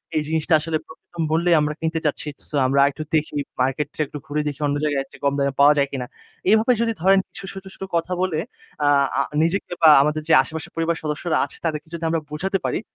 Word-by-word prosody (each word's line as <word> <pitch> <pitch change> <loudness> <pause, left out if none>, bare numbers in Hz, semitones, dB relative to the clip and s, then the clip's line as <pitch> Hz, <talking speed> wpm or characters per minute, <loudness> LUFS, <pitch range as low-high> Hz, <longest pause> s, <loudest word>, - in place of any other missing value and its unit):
এই 155 - +2
জিনিসটা 160 +1 0
আসলে 160 +1 -1
খুব 160 - -13 0.2
কম 165 -1 -2
মূল্যেই 170 +1 +3
আমরা 150 0 0
কিনতে 160 0 -1
চাচ্ছি। 150 +1 -1 0.2
সো, 150 - -5
আমরা 140 +1 +2
একটু 155 +3 -6
দেখি, 155 -1 0 0.3
মার্কেটটা 135 +4 -1
একটু 145 - -8
ঘুরে 150 +1 -1
দেখি 145 -1 -4
অন্য 145 - 0
জায়গায় 145 -2 +1
এর - - -22
চেয়ে - - -16
কম 140 - +3
দামে 140 -1 +1
পাওয়া 145 +1 +7
যায় 140 0 +3
কিনা।" 130 -3 -3 0.5
এভাবে 220 +3 +4
যদি 230 -1 +1
ধরেন 195 +1 +5
কিছু - - -9
ছোট, 195 0 -8
ছোট - - -8
কথা 170 +2 0
বলে 175 -4 0 0.5
আ - - +3 0.3
আ - - +4 0.2
নিজেকে 175 +2 -1
বা 160 - +8
আমাদের 150 +1 0
যে 165 - +4
আশেপাশের 160 0 -7
পরিবারের 165 0 -1
সদস্যরা 155 +2 -1
আছে - - -11
তাদেরকে 155 -1 -2
যদি 170 0 -5
আমরা 165 -1 0
বোঝাতে 190 +6 -1
পারি - - 0
155 Hz, 225 wpm, -22 LUFS, 150-170 Hz, 0.5 s, বা